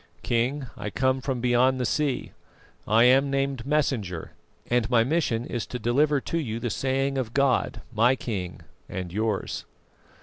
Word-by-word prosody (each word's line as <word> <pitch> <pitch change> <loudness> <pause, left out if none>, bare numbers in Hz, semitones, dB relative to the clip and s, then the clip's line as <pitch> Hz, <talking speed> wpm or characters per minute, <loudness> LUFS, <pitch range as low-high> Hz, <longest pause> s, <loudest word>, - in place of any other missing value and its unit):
"King, 125 +4 0
I 105 - -5
come 130 +4 +1
from 130 -2 -2
beyond 125 +2 +3
the 125 - 0
sea; 140 -1 -1 0.6
I 110 +2 +5
am 135 +3 +5
named 135 -2 -1
Messenger, 120 - -1 0.4
and 120 -2 +1
my 115 -2 +4
mission 125 -4 0
is 120 -4 -4
to 125 - -4
deliver 140 +6 +2
to 165 - -2
you 115 -7 -3
the 120 -1 -2
saying 135 +3 0
of 120 -3 -4
God, 140 -2 +1
my 120 +4 +4
King 95 -9 -5 0.3
and 90 -2 -5
yours." 110 -1 -2
125 Hz, 160 wpm, -26 LUFS, 115-135 Hz, 0.6 s, I